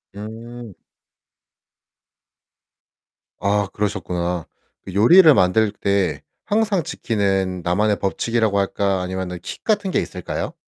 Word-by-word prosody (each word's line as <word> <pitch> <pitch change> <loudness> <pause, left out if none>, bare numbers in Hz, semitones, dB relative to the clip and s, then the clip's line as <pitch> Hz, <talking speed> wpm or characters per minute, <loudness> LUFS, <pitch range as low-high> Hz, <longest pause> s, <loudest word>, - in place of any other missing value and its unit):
음. 115 +2 -9 2.7
아 100 0 +1
그러셨구나. 90 -4 -2 0.4
그 95 - -9
요리를 155 - +7
만들 105 +1 +3
때 100 -4 -1 0.2
항상 205 -4 +1
지키는 95 -7 -1
나만의 100 +4 +1
법칙이라고 110 +1 0
할까? 100 -1 0
아니면은 90 -1 -4
킥 - - -8
같은 205 -3 0
게 - - +2
있을까요? 90 -2 -4
100 Hz, 230 characters per minute, -21 LUFS, 95-115 Hz, 2.7 s, 요리를